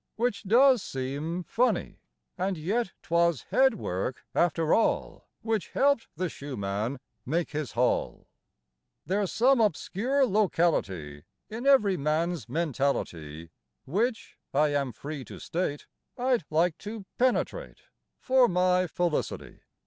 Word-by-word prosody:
Which 230 -3 -1
does 245 +4 +5
seem 145 +7 -4
funny; 245 +8 0 0.4
And 185 0 -1
yet 190 +6 -1
'twas 170 -3 +2
head 265 -3 +4
work, 110 - -4
after 165 -2 +2
all, 225 - 0 0.2
Which 225 -3 -1
helped 280 -4 +2
the 185 +3 -1
shoe 140 -4 -7
man 105 +6 -2 0.2
make 165 +8 -1
his 150 -5 -4
haul. 125 +2 0 0.8
There's 195 0 0
some 255 +1 +4
obscure 225 - +1
locality 155 - 0 0.3
In 235 +5 -4
every 210 -9 +5
man's 155 +4 -1
mentality 90 - -2 0.3
Which, 220 - -2 0.2
I 150 +1 +4
am 140 -3 0
free 140 +4 -7
to - - -10
state, 165 -4 -3 0.3
I'd 250 -7 +1
like 160 +1 +1
to 210 -1 -7
penetrate 260 - 0 0.3
For 260 -1 +4
my 180 -1 +2
felicity. 175 -1 -2
175 Hz, 120 wpm, -28 LUFS, 145-225 Hz, 0.8 s, does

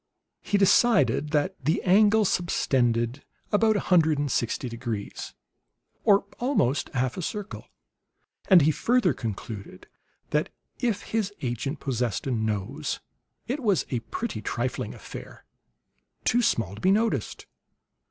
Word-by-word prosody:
He 205 - 0
decided 200 -5 +4
that 150 +5 +1
the 155 +4 +2
angle 210 +3 +5
subtended 125 -8 +1 0.3
about 220 +1 +3
a - - +2
hundred 160 -4 +5
and 145 -1 -1
sixty 120 +2 -1
degrees, 115 -3 -5 0.7
or 200 -2 +4
almost 240 - +1
half 130 0 0
a - - -2
circle; 210 +4 -5 0.8
and 180 -6 +7
he 155 - +4
further 230 - +2
concluded 110 -2 -7 0.5
that - - +1 0.3
if 225 -5 -1
his 220 -3 -1
agent 130 +4 -3
possessed 120 -5 -1
a 135 - -1
nose, 110 -4 -2 0.5
it 260 +5 -2
was 205 - +1
a 125 - 0
pretty 235 - -5
trifling - - -3
affair, - - -10 0.8
too 245 - +3
small 115 - +1
to 100 - -10
be 185 - +3
noticed. 220 +3 0
155 Hz, 130 wpm, -26 LUFS, -, 0.8 s, and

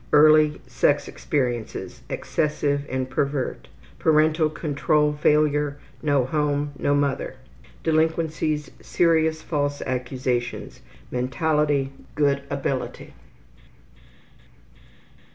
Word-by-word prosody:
Early 155 0 +6
sex - - +1
experiences: 120 -5 -3
Excessive 145 -1 -1
and 130 0 -2
pervert. 140 0 -2 0.3
Parental 155 0 +3
control 150 0 +1
failure: 150 -1 +2 0.2
No 145 -4 +2
home, 145 +1 0
no 145 - +2
mother. 140 -2 -1 0.5
Delinquencies: 160 -1 +1
Mentality: - - -22
Serious 160 -2 +2
false 145 -2 -1
accusations. 125 -1 -3 0.4
Good 140 0 0
ability. 140 -2 -3
145 Hz, 80 wpm, -24 LUFS, 140-155 Hz, 0.5 s, Early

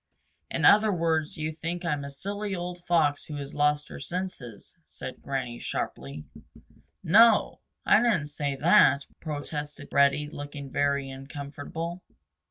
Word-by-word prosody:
"In - - 0
other 215 +1 +7
words 165 -3 0
you 155 0 -2
think 170 +3 -5
I'm 150 -4 -1
a 140 - -6
silly 200 +7 -4
old 175 0 -6
Fox 155 -4 +2
who 150 - -7
has 140 -1 -6
lost 150 0 +1
her - - -8
senses," 140 - -6
said 130 -4 -8
Granny 125 -3 -3
sharply. 70 +4 -4 0.8
"No 225 +8 +8
o. 215 - 0 0.3
I - - +6
didn't 215 -11 +2
say 145 -1 -2
that," 140 -2 +5
protested 145 -1 -5
Reddy, 140 +1 +3
looking 145 -2 -8
very 140 -1 0
uncomfortable. 145 +5 -6
150 Hz, 140 wpm, -27 LUFS, 140-175 Hz, 0.8 s, No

